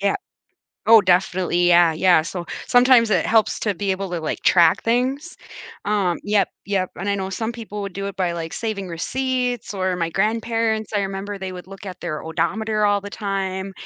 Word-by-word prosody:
Yeah. 200 0 +1 0.7
Oh, 225 0 +8
definitely, 180 -1 +2
yeah, 170 -1 +5
yeah, 175 0 +4
so, 175 0 -5 0.2
sometimes 245 -2 +5
it - - +2
helps 220 -2 +2
to 205 -2 0
be 195 +1 -2
able 190 0 -3
to, 175 -2 -3
like, 155 - -4
track 170 -3 +4
things, 260 +8 -1 0.5
um 200 -4 +1
yep, 205 -1 +2 0.2
yep, 195 -2 -1
and 195 - -4
I 200 - +1
know 190 -1 -3
some 220 +4 -3
people 210 -3 -7
would 195 -2 -6
do 200 0 -4
it 195 - -7
by, 180 -2 0
like, 165 -1 -5
saving 205 -5 -4
receipts, 250 +6 -2
or 185 -1 -1
my 170 -2 -1
grandparents, 220 +2 0
I 205 - +2
remember 195 +1 -4
they 190 -1 -6
would 180 0 -9
look 195 +1 -11
at 185 -2 -8
their 155 -3 -4
odometer 215 +6 -1
all 205 0 +3
the 205 +1 -8
time, 195 -2 -3
195 Hz, 195 wpm, -21 LUFS, 185-220 Hz, 0.7 s, Oh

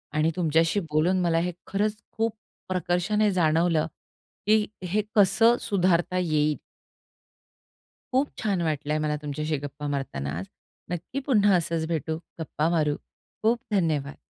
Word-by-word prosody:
आणि 155 +2 +3
तुमच्याशी 165 +2 +2
बोलून 170 +5 +3
मला 170 -2 +2
हे 180 +2 0 0.2
खरंच 210 +2 0 0.2
खूप 225 0 0 0.4
प्रकर्षाने 185 +3 +1
जाणवलं, 165 -2 +2 0.6
की 215 0 +5 0.2
हे 200 +4 +1
कसं 225 +4 +5
सुधारता 185 -2 +1
येईल. 155 -4 +1 1.6
खूप 270 +3 +2
छान 200 -5 0
वाटलंय 150 -2 -1
मला 150 0 0
तुमच्याशी 150 +1 -2
गप्पा 145 +1 -5
मारताना 135 - -3
आज. 95 - -5 0.4
नक्की 175 +10 -4
पुन्हा 205 -7 +5
असंच 165 -2 0
भेटू, 160 -1 -2 0.2
गप्पा 160 0 -1
मारू. 150 -2 +2 0.5
खूप 230 +2 +3
धन्यवाद. 155 -8 0
170 Hz, 125 wpm, -26 LUFS, 155-200 Hz, 1.6 s, की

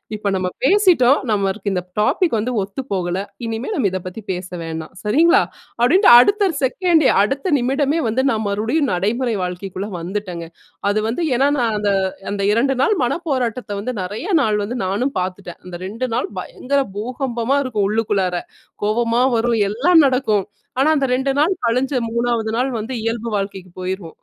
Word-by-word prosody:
இப்ப 210 -1 -2
நம்ம 185 -1 -1 0.2
பேசிட்டோம், 335 -7 +5
நம்மளுக்கு 200 0 -1
இந்த 180 - 0 0.2
டாபிக் 275 - +2
வந்து 235 +4 -2
ஒத்துப்போகல, 190 -4 -3 0.3
இனிமே 225 - -4
நம்ம 245 - +1
இதப்பத்தி 185 +3 -6
பேச 180 0 -5
வேணாம், 160 -1 -6
சரிங்களா? 330 - +4 0.4
அப்டின்ட்டு 365 - +5
அடுத்த 400 - +3
செகண்டே 320 +2 +3
அடுத்த 275 - -1
நிமிடமே 275 +5 +1
வந்து 250 +4 +1
நான் 220 -1 -1
மறுபடியும் 235 +8 0
நடைமுறை 225 +6 0
வாழ்க்கைக்குள்ள 185 +2 -5
வந்துட்டேங்க. 180 -2 -5 0.4
அது 210 +1 +1
வந்து 245 +9 -2
ஏன்னா 275 +3 +3
நான் 230 -3 +1
அந்த 205 -1 +1 0.4
அந்த 200 - -2
2 265 +5 +2
நாள் 425 - +3
மன 275 +7 0
போராட்டத்த 245 -4 -2
வந்து 255 +4 -3
நெறையா 210 - -4
நாள் 215 -5 +1
வந்து 235 +5 -4
நானும் 225 +9 -1
பாத்துட்டேன். 180 -1 -5
அந்த 180 -1 -8
2 230 +6 -3
நாள் 245 - -1
பயங்கர 280 +7 -1 0.2
பூகம்பமா 245 +2 -1
இருக்கும் 215 -7 0
உள்ளுக்குள்ளார. 205 -4 0 0.5
கோவமா 230 +3 +1
வரும் 230 -1 +1
எல்லாம் 315 - +4
நடக்கும். 220 -7 +1 0.3
ஆனா 275 +4 +4
அந்த 270 -1 +1
2 265 +1 0
நாள் 335 +6 +3
கழிஞ்சு 255 +3 0
3ஆவது 235 -2 0
நாள் 260 +2 0
வந்து 225 +5 -5
இயல்பு 230 0 -2
வாழ்க்கைக்கு 195 -2 -5
போயிருவோம். 185 -3 -5
230 Hz, 155 wpm, -20 LUFS, 200-265 Hz, 0.5 s, பேசிட்டோம்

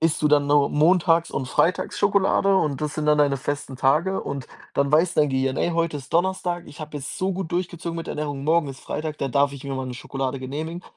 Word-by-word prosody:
isst 165 -1 +1
du 150 - +4
dann 145 -1 +4
nur 145 -1 +4
montags 165 +2 +3
und 130 - -3
freitags 180 - +1
Schokolade 195 -1 +3
und 150 -7 +1
das 150 0 -2
sind 150 -1 -2
dann 150 0 +4
deine 145 -2 +3
festen 140 0 -4
Tage. 155 +9 +2
Und 140 -2 -5 0.3
dann 140 +1 +1
weiß 170 +3 +4
dein 150 -1 +3
Gehirn: 130 0 0
„Ey, 175 - +1
heute 165 -2 0
ist 135 +1 -13
Donnerstag. 175 0 0
Ich 150 - -12
habe 155 -1 -6
jetzt 135 - -6
so 190 +1 0
gut 185 -3 -4
durchgezogen 175 -1 -3
mit 165 - -6
Ernährung. 145 -2 -4
Morgen 160 -1 +2
ist 135 - -9
Freitag, 155 0 -4
da 135 - -1
darf 140 +2 +2
ich 140 0 -9
mir 140 -1 -3
mal 130 0 -3
'ne 125 - -5
Schokolade 135 +1 -4
genehmigen.“ 155 +7 -5
150 Hz, 235 wpm, -24 LUFS, 140-170 Hz, 0.3 s, du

